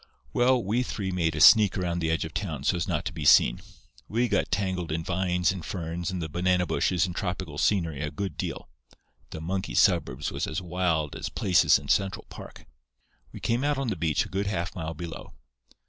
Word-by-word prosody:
"Well, 125 0 +3
we 110 +6 0
three 100 -6 -3
made 85 -3 0
a - - -3
sneak 105 -5 +7
around 85 -2 -1
the 80 -1 -1
edge 80 0 0
of 80 - -8
town 85 -7 -4
so 90 - +2
as 85 - -2
not - - -2
to - - -3
be 80 -2 -5
seen. - - +5 0.5
We 120 +3 0
got 105 -3 0
tangled 95 -4 -2
in 80 +1 -2
vines 90 0 0
and 95 -3 -6
ferns 85 0 -4
and 95 -1 -3
the 80 - -3
banana 90 +2 +1
bushes 90 +1 +1
and 90 -2 -6
tropical 90 -5 -4
scenery 85 -8 +1
a 75 - -2
good 95 -2 -5
deal. - - -5 0.6
The 80 - -7
monkey 90 -6 -3
suburbs 65 +4 +2
was - - -3
as 80 - -3
wild 85 -4 -1
as - - -4
places 90 -2 +4
in 70 - -10
Central 100 +7 0
Park. - - -11 0.7
We - - -9
came 120 +3 0
out 145 -1 +1
on 135 -3 -1
the 105 - -1
beach 80 -3 0
a - - -11
good 100 +1 -2
half 90 -3 -2
mile 80 -2 -4
below. 85 +1 -8
90 Hz, 210 wpm, -27 LUFS, 80-95 Hz, 0.7 s, sneak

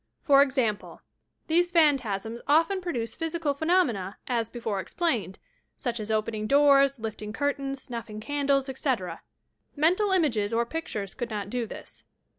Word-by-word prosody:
For 280 -1 +6
example: 260 -7 -1 0.4
these 350 +2 +2
phantasms 245 - +2
often 330 +6 +3
produce 245 -11 -3
physical 325 -3 -1
phenomena, 280 - +1
as 230 -3 -1
before 225 -5 -3
explained, 215 - -1 0.2
— - - -45
such 240 -3 -3
as 215 0 -5
opening 215 0 -1
doors, 275 0 +5
lifting 220 -2 -5
curtains, 275 0 -2
snuffing 230 -3 -6
candles, 280 +2 0
etc. 255 - -2 0.5
Mental 360 +7 +3
images 235 - +1
or 235 +1 +2
pictures 225 -9 -4
could 240 -3 -4
not 205 -2 -4
do 245 -2 -2
this. - - -10
260 Hz, 140 wpm, -27 LUFS, 220-295 Hz, 0.5 s, For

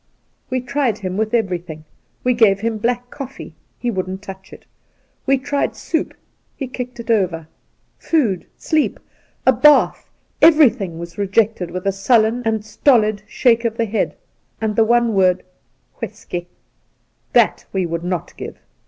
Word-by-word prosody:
We 255 -1 -1
tried 255 -4 0
him 185 -3 -4
with 215 +1 -1
everything. 180 -8 -2 0.4
We 250 - +3
gave 205 -4 +4
him 225 -1 -1
black 245 +2 -1
coffee 275 -1 -8
— - - -44
he 245 - -2
wouldn't 190 -1 -4
touch 190 -1 -10
it; - - -13 0.6
we 275 0 +4
tried 285 +2 -1
soup 320 -2 -2 0.2
— - - -45
he 275 - -3
kicked 250 -1 -6
it 235 0 -2
over; 180 -7 0 0.5
food, 235 - 0
sleep, 315 -2 0 0.5
a - - +6
bath 295 -1 +4 0.2
— - - -42
every 300 -6 +6
thing 175 -5 -6
was 170 +4 -8
rejected 200 -2 +1
with 180 +2 -6
a 195 - +3
sullen 220 +4 +2
and 220 -1 0
stolid 215 -2 +2
shake 235 -2 +2
of 230 -1 -1
the 230 - +1
head, 215 0 -1 0.4
and 220 -2 -1
the 225 - +5
one 235 0 +3
word 185 -2 +3 0.3
' - - -39
W'isky.' 175 0 -5 0.9
That - - +3
we 190 -2 0
would 170 0 -3
not 180 -2 -3
give. - - -7
220 Hz, 165 wpm, -19 LUFS, 190-245 Hz, 0.9 s, a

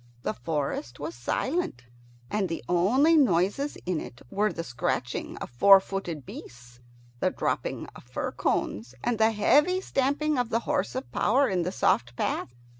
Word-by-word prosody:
The 110 - -1
forest 130 -1 -3
was 150 +3 -4
silent, 120 - -2 0.5
and 205 -3 0
the 165 - -4
only 245 - +4
noises 245 - +2
in 175 -3 -1
it 120 - -10
were 210 +1 +1
the 165 - -5
scratching 125 -2 -3
of - - -7
four 195 +11 +8
footed 180 -7 -5
beasts, 125 0 -11 0.4
the - - +2
dropping - - -2
of - - -12
fir - - -4
cones, 120 +5 -2
and 235 -2 0
the 220 0 +5
heavy 295 - +3
stamping 285 -2 0
of 245 -2 0
the 230 0 +1
horse 295 0 -1
of 260 - -5
power 265 +6 +3
in 185 -2 0
the 175 +2 -2
soft 120 -9 +1
path. 120 - -2
190 Hz, 165 wpm, -27 LUFS, -, 0.5 s, four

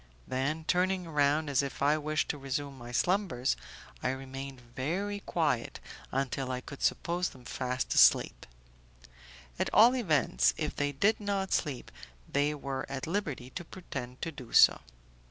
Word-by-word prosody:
Then, 145 +5 -1
turning 185 0 +1
round 150 0 +2
as 140 -2 +2
if 140 0 -4
I 145 +2 +4
wished 155 0 -1
to 145 - -2
resume 140 +1 -3
my 120 -2 -9
slumbers, 160 -3 +1 0.5
I - - 0
remained 135 0 -6 0.2
very 195 +10 -2
quiet 150 -11 -1 0.3
until 135 0 -1
I 125 - -2
could 140 +2 -10
suppose 175 +1 0
them 125 -2 -16
fast 125 +1 -2
asleep; - - +5 1.1
at - - +1
all 240 +4 +7
events, 145 - +2
if - - -2
they 145 0 0
did 200 +11 +2
not 200 -2 -1
sleep, 140 -6 -2 0.4
they 145 +1 +1
were 135 -2 -4
at 135 -1 -4
liberty 155 -9 -3
to 175 - -5
pretend 135 -9 -7
to 165 - -2
do 130 -6 -11
so. - - +7
145 Hz, 155 wpm, -30 LUFS, 130-175 Hz, 1.1 s, all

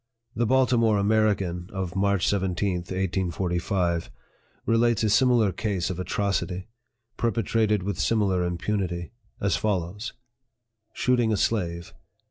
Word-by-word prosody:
The 120 0 +1
Baltimore 120 -4 +3
American, 100 -4 +1
of 95 -2 -4
March 100 -2 +2
17, 95 -1 0
1845, 90 -1 -1 0.6
relates 115 -1 +2
a 110 - +2
similar 120 -2 +4
case 95 -1 -2
of 90 - -5
atrocity, 95 -1 -2 0.5
perpetrated 110 -2 +1
with 100 +1 -3
similar 100 -5 +2
impunity 90 0 -2 0.3
as 100 -4 +1
follows: 100 +1 -2 0.8
"Shooting 120 -3 +1
a 105 - +1
Slave. 85 -6 -1
100 Hz, 105 wpm, -26 LUFS, 90-110 Hz, 0.8 s, similar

